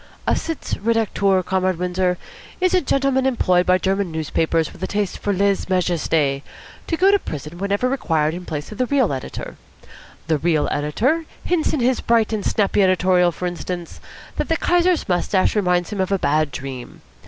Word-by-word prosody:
"A - - +2
sitz 325 -2 -4
redacteur, 200 -4 +1
Comrade 185 -1 0
Windsor, 180 0 0 0.4
is 370 0 +2
a 365 - +4
gentleman 270 -2 +1
employed 180 -8 +2
by 185 0 +5
German 190 -1 -1
newspapers 160 0 0
with - - -16
a - - -1
taste 205 -2 -2
for 205 - -1
lèse 200 0 +1
majesté 165 -6 +1 0.5
to 330 - -1
go 385 +3 +5
to 405 - +4
prison 150 - -7
whenever 200 +5 0
required 160 - 0
in 180 +1 -6
place 155 -1 -5
of 215 - -9
the 255 - +1
real 260 - +2
editor. 130 - -6 0.7
The 155 -1 +1
real 160 -1 +1
editor 240 - 0 0.2
hints 345 -3 +1
in 295 - -1
his 250 +1 +2
bright 230 -1 +2
and 210 -2 -2
snappy 205 -1 +1
editorial, 185 -1 +3
for 180 - -6
instance, 175 0 -5 0.4
that - - -2
the 325 - +2
Kaiser's 355 0 +2
moustache 185 +2 +1
reminds 180 -4 +1
him 200 -2 -1
of 190 - -1
a 195 - +3
bad 155 -2 +1
dream. 130 -1 -8
185 Hz, 180 wpm, -21 LUFS, 165-230 Hz, 0.7 s, by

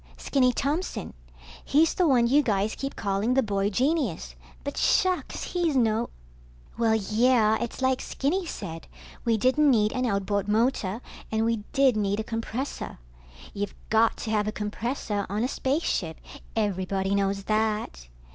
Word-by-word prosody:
Skinny 255 -3 +2
Thompson. 280 - -2 0.5
He's 315 +3 +3
the 360 - +2
one 250 -5 +4
you 275 +5 +4
guys 210 -4 0
keep 275 0 -5
calling 205 +4 0
the 265 - +4
boy 200 -2 0
genius, 245 - 0 0.3
but - - -4
shucks, 370 -1 +1
he's 345 -5 +1
no... 230 -2 +2 0.7
Well, 225 -1 +2
yeah, 220 +1 +3
it's 240 +2 -4
like 260 0 +2
Skinny 345 +7 -1
said, 165 - -6 0.4
we 230 -2 +3
didn't 260 +7 +3
need 215 -4 +3
an 255 -1 0
outboard 200 -1 0
motor, 220 -1 +1 0.3
and 220 0 +1
we 230 0 +1
did 270 -4 +4
need 205 -1 0
a - - -1
compressor. 230 +4 -4 0.6
You've 205 0 -4 0.2
got 225 +1 +4
to 220 - -3
have 210 -1 +1
a - - 0
compressor 210 0 -3
on 210 +3 -1
a - - +2
spaceship, 260 - -1 0.4
everybody 195 -2 0
knows 195 0 0
that. 215 - -1
220 Hz, 150 wpm, -26 LUFS, 205-260 Hz, 0.7 s, one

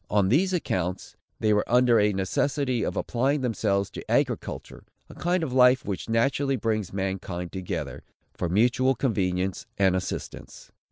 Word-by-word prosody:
On 100 -2 +2
these 175 - +3
accounts, 95 - -2 0.2
they 110 -1 +2
were 105 - +2
under 120 -2 +5
a 105 0 +3
necessity 125 +6 0
of - - -2
applying 135 +4 0
themselves 100 -5 0
to - - -8
agriculture, - - -1 0.3
a - - -11
kind 175 0 0
of 135 -6 -3
life 125 0 +5
which 100 +2 -4
naturally 135 +4 +1
brings 110 -4 -1
mankind 95 -2 -4
together, 95 -2 -5 0.3
for 90 - -3
mutual 125 +7 +3
convenience 95 -6 -1
and 95 -2 +3
assistance. 90 - -6
110 Hz, 150 wpm, -26 LUFS, 95-130 Hz, 0.3 s, under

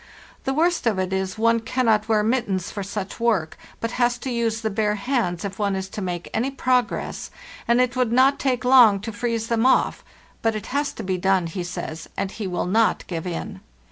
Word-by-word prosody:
The 270 - 0
worst 335 -3 +2
of 215 -4 +2
it 185 0 -1
is 190 +1 -2
one 230 +1 +3
cannot 225 -2 +1
wear 215 -1 +3
mittens 215 -6 0
for 205 - -5
such 195 0 -5
work, 215 -9 +1 0.2
but 230 - -2
has 240 0 +3
to 255 +1 -5
use 230 -1 -1
the 220 -1 -1
bare 210 0 +1
hands 205 -6 -1
if 195 0 -6
one 200 -2 +1
is 190 0 -3
to 210 - -6
make 175 -2 -4
any 240 +5 0
progress, 255 -2 -1 0.4
and 235 +1 +4
it 250 -1 +2
would 250 -3 +1
not 260 +3 +4
take 255 -2 0
long 245 -6 +7
to 225 - -5
freeze 230 +1 -2
them 230 0 0
off; 260 - +3 0.4
but 225 -1 +1
it 215 - -5
has 285 0 0
to 225 - -7
be 185 -2 -1
done, 190 -1 +2
he 170 +2 -4
says, 165 -2 -6
and 190 - -2
he 210 -2 -5
will 180 -1 -2
not 220 +5 +2
give 170 -1 -4
in. 165 - -5
220 Hz, 215 wpm, -23 LUFS, 190-240 Hz, 0.4 s, long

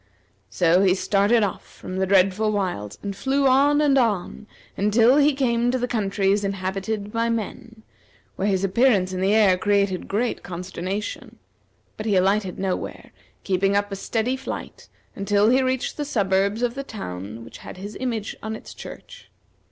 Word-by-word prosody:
So 175 - +3
he 190 -2 +4
started 205 +4 +2
off 195 - -2
from 185 - -9
the 190 - +1
dreadful 195 +3 +3
wilds, 175 - -3
and 200 -1 -4
flew 275 +6 0
on 285 +3 +4
and 280 -2 +4
on 215 -3 -1 0.3
until 225 +6 +4
he 295 -1 +4
came 240 -3 +1
to 255 - +1
the 245 0 -1
countries 200 -2 0
inhabited 195 +2 -3
by 230 0 0
men, 230 0 -5 0.5
where 195 - -1
his 195 -2 +1
appearance 195 -2 +2
in 185 - -3
the 190 +1 +2
air 195 -4 +4
created 200 -2 +1
great 225 +4 -1
consternation; 185 +3 -5 0.6
but 215 - -5
he 205 - +2
alighted 190 0 +1
nowhere, 190 -1 -4 0.3
keeping 195 +1 +1
up 205 0 0
a - - -2
steady 225 +5 -1
flight 265 +1 -7 0.3
until 205 +1 +2
he 260 +1 +4
reached 260 -1 -1
the 295 - -1
suburbs 200 -3 0
of 240 -1 +1
the 275 - -4
town 110 - -7
which - - -12
had - - -10
his 200 +2 -8
image 230 -5 -3
on 220 0 -4
its - - -10
church. - - -11
205 Hz, 165 wpm, -23 LUFS, 190-235 Hz, 0.6 s, he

